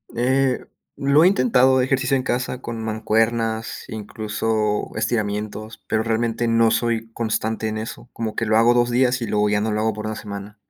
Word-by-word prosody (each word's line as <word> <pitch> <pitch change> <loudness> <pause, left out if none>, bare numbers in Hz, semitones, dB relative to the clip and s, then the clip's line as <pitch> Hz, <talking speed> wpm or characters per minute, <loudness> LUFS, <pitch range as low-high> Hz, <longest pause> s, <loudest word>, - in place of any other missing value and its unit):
Eh, 130 +2 +1 0.3
lo 140 +3 +4
he - - +7
intentado 130 - +4
ejercicio 135 +1 +1
en 130 - -2
casa 125 0 -2
con 115 -2 -5
mancuernas, 110 +1 -1
incluso, 110 0 -2
estiramientos, 110 0 -3
pero 110 - +1
realmente 115 +1 0
no 115 0 +3
soy 115 0 -1
constante 110 -1 -2
en 110 0 -3
eso. 110 +2 -7
Como 110 -2 -4
que 115 - -1
lo 110 0 +3
hago 115 +2 +5
2 120 0 +2
días, 125 0 +2
y 115 - -2
luego 105 0 +1
ya 105 0 +1
no 110 +1 -1
lo 105 0 0
hago 110 0 +1
por 105 +1 -5
1 110 - -3
semana. 105 0 -8
115 Hz, 185 wpm, -22 LUFS, 110-120 Hz, 0.3 s, he